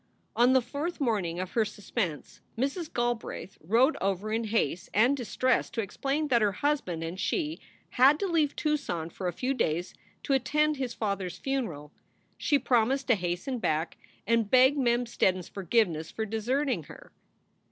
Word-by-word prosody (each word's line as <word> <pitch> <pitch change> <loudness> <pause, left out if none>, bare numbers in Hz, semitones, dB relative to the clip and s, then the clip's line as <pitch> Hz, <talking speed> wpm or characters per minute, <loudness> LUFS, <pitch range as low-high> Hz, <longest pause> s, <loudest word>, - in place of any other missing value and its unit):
On 245 +2 +5
the 260 -2 +4
fourth 290 +8 -4
morning 200 - 0
of 185 0 -4
her 230 - +2
suspense 205 -5 -4 0.2
Mrs. 280 +7 -2
Galbraith 240 -5 -3
rode 235 - +3
over 195 +2 -1
in 225 0 0
haste 205 -6 -1
and 240 +7 +5
distress 255 0 0
to 230 - -2
explain 275 +9 -2
that 240 -3 +4
her 205 -2 +2
husband 190 - -1
and 170 +3 -5
she 315 - -1 0.3
had 270 +4 +5
to - - 0
leave 320 -6 +1
Tucson 180 - -2
for 185 - -4
a - - 0
few 255 +10 -1
days 175 - -1 0.3
to 275 - 0
attend 300 +3 +2
his 260 -3 -3
father 200 -4 -2
s 180 0 -8
funeral. 180 - -3 0.5
She 290 - +3
promised 260 +1 +2
to - - +7
hasten 180 +7 -3
back, 160 -5 -1 0.3
and 230 -1 +2
begged 260 +3 +6
Mem 240 -1 +2
Steddon 190 -5 +1
s 180 - -8
forgiveness 180 -5 0
for 220 - -3
deserting 225 - -1
her. - - -13
230 Hz, 170 wpm, -28 LUFS, 185-270 Hz, 0.5 s, to